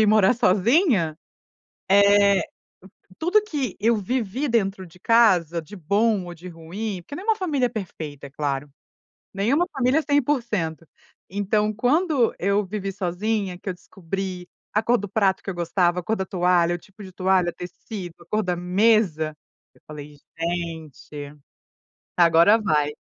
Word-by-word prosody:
ir 215 - +5
morar 210 +1 +5
sozinha, 220 - +2 0.7
eh, 200 -1 +5 0.8
tudo 360 +6 +3
que 285 - -4
eu 230 +1 +3
vivi 245 +5 -2
dentro 195 -5 0
de 170 +1 -18
casa, 180 -8 +3
de 205 +6 -12
bom 200 +3 +1
ou 175 - -8
de 175 +2 -11
ruim, 180 +4 -6
porque 285 - -10
não 365 - -7
é - - -11
uma 445 - +4
família 285 -10 0
perfeita, 155 - -7
é - - -13
claro. 145 0 -3 0.6
Nenhuma 245 - +1
família 265 0 +2
é - - 0
100%. 235 - -1 0.4
Então, 210 +2 0
quando 260 - +2
eu 200 +3 +1
vivi 195 0 -4
sozinha, 195 0 -2
que 190 - -8
eu 185 - -2
descobri 180 0 -6 0.2
a 215 - +1
cor 240 +2 +3
do 205 - -5
prato 195 -1 +1
que - - -5
eu - - -5
gostava, 175 +1 +1
a - - -13
cor 220 - -1
da 190 - -2
toalha, 175 -2 +2
o - - -13
tipo 195 +4 -16
de 190 - -9
toalha, 185 -2 +1
tecido, 180 0 -8
a - - -15
cor 215 +4 0
da 180 -1 0
mesa, 180 -4 +2 0.4
eu - - -25
falei: 150 -1 -10 0.2
"Gente, 160 -4 -5 0.8
agora 170 +4 +6
vai." 150 -8 +1
195 Hz, 160 wpm, -23 LUFS, 175-220 Hz, 0.8 s, agora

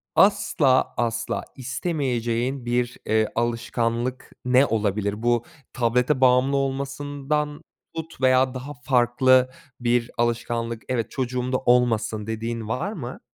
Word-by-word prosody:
asla 145 -9 +3
asla 115 0 -1
istemeyeceğin 130 -3 -2
bir, 120 0 -1
eee, 110 0 +2
alışkanlık 120 +1 -1
ne 130 +2 +5
olabilir? 105 -1 -1
Bu 120 +1 +2 0.3
tablete 125 +3 +1
bağımlı 130 +2 +4
olmasından 145 +2 -2 0.3
tut 160 -4 -7
veya 130 0 +4
daha 135 +3 -6
farklı 125 0 +3 0.3
bir 120 0 +1
alışkanlık, 115 -1 -1
"Evet, 120 -4 -1
çocuğum 125 -1 -2
da 130 - +2
olmasın." 115 -4 +1
dediğin 115 0 -4
var 175 - -2
mı? 130 - -7
125 Hz, 110 wpm, -24 LUFS, 115-135 Hz, 0.3 s, ne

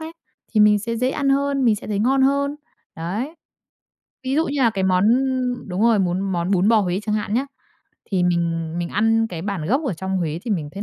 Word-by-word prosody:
ấy, 320 +1 -7 0.4
thì 215 - +3
mình 210 0 +6
sẽ 230 +3 -4
dễ 250 +3 0
ăn 280 0 -1
hơn, 275 0 +1
mình 225 -3 +4
sẽ - - -9
thấy 210 -2 -2
ngon 265 +5 +2
hơn. 280 +1 +1 0.4
Đấy, 210 - -4 0.9
ví 260 +1 -1
dụ 320 +2 +2
như 280 0 -2
là 230 - +4
cái 195 -3 -2
món, 185 0 +2
ưm 255 -1 0
đúng 185 +2 -2
rồi, 230 -2 +4
muốn 180 -1 0
món 185 -2 -2
bún 190 0 +3
bò 225 -1 +5
Huế 185 -1 -1
chẳng 210 0 -1
hạn 210 0 -2
nhá, 260 +4 0 0.6
thì 190 -3 +1
mình 165 -2 0
mình 175 -1 -2
ăn 225 +3 +2
cái 170 -4 -6
bản 195 -5 -3
gốc 265 - +1
ở 225 - -1
trong 190 +3 -3
Huế 165 -2 -2
thì 235 - -5
mình 165 -8 -1
thấy 200 - -5
210 Hz, 240 wpm, -21 LUFS, 185-255 Hz, 0.9 s, mình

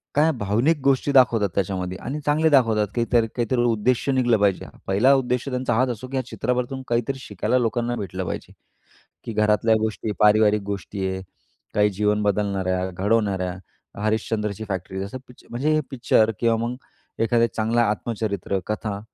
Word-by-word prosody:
काय 155 +3 +4
भावनिक 115 +10 +1
गोष्टी 140 +1 +2
दाखवतात 120 -6 +4
त्याच्यामध्ये 95 -1 -2
आणि 145 +3 -4
चांगले 155 +2 +3
दाखवतात 115 -7 +3
काहीतरी, 120 -1 +2
काहीतरी 120 0 0
उद्देश्य 120 +3 +1
निघलं 125 -3 +3
पाहिजे. 100 -2 +1 0.2
पहिला 105 +8 +4
उद्देश 125 -1 -1
त्यांचा 125 -1 -1
हाच 130 +3 +2
असो, 120 +1 -5
की 135 +1 -4
या 130 - -2
चित्रपटातून 125 +1 -2
काहीतरी 120 +3 -1
शिकायला 130 - -1
लोकांना 120 0 0
भेटलं 95 -3 -4
पाहिजे, - - -6 0.7
की - - -5
घरातल्या 105 +1 +3
गोष्टी, 110 0 -2
पारिवारिक 105 0 +4
गोष्टी 100 -1 -4
आहे. 95 0 -4 0.5
काही 105 0 +3
जीवन 105 +1 0
बदलणाऱ्या 95 -2 0
घडवणाऱ्या 95 -1 0 0.5
हरिश्चंद्रची 110 -1 -1
फॅक्ट्री 95 -1 -4
जसं 100 +6 -5
पिक्च 125 - -17
म्हणजे 135 +6 -1
हे 155 - +3
पिक्चर 120 -4 +2
किंवा 115 -1 +3
मग 120 +2 -3 0.5
एखादं 115 0 +3
चांगलं 115 +2 +1
आत्मचरित्र, 105 -3 -1
कथा 105 -1 -3
110 Hz, 155 wpm, -23 LUFS, 100-125 Hz, 0.7 s, काय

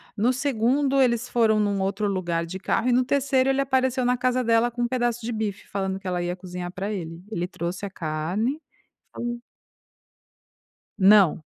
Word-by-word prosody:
no 230 +4 +2
2º 270 +2 +1
eles 245 -1 +2
foram 225 -3 +3
num 200 -2 0
outro 200 +2 -1
lugar 175 -4 -1
de 175 +3 -6
carro 230 +5 0
e - - +3
no 255 +1 +4
3º 270 0 +2
ele 270 0 +1
apareceu 260 -2 +1
na 250 +1 +3
casa 255 0 +1
dela 230 +1 +3
com 240 +1 -3
um 240 - +1
pedaço 240 -2 -1
de 240 - -2
bife 215 -2 -4
falando 190 -1 -3
que 190 - -9
ela 180 -1 -1
ia 175 0 -2
cozinhar 180 -1 -7
pra 195 +3 -4
ele, 165 -2 -6
ele 175 -6 -2
trouxe 180 +1 -5
a - - -4
carne, 185 - -2 0.5
falou 240 0 -4 1.6
Não. 195 -5 +5
220 Hz, 180 wpm, -25 LUFS, 185-250 Hz, 1.6 s, Não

